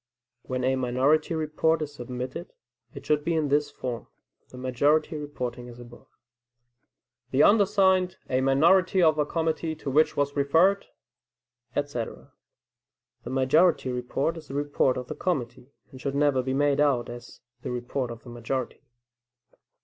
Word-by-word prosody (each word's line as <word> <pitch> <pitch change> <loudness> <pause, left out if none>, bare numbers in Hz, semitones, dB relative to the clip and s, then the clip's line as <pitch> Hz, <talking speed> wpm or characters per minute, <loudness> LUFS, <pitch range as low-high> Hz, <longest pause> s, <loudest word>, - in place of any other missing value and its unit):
When 130 0 -4
a 130 +1 +2
minority 135 +6 +1
report 160 +1 0
is 145 -1 -7
submitted, 125 +6 -6 0.4
it - - -9
should 150 -1 +1
be 170 +1 0
in 155 -3 0
this 145 +1 +2
form 125 -4 -6 0.4
(the 125 - -12
majority 145 +5 +1
reporting 125 -5 -5
as 120 - -12
above): 120 0 -14 1.2
"The 140 +3 +3
undersigned, 190 -3 +3
a 130 0 0
minority 165 +8 +4
of 155 -2 +4
a 150 - +1
committee 160 0 -1
to 145 -3 -5
which 155 +4 +3
was 145 0 0
referred," 165 +8 +3 0.9
etc. 140 -5 -4 0.9
The - - -5
majority 135 +2 +3
report 125 +6 -2
is 155 - -11
the 135 - -7
report 145 -2 +1
of 125 - -4
the - - -6
committee, 130 -7 -3 0.2
and 130 - -12
should 140 -1 -3
never 140 -2 +2
be 130 +1 -2
made 145 0 +2
out 140 -5 +2
as 120 0 -10 0.2
the - - -5
report 125 +1 -3
of 115 -1 -9
the 125 - -12
majority. 120 +2 -4
140 Hz, 150 wpm, -26 LUFS, 125-155 Hz, 1.2 s, minority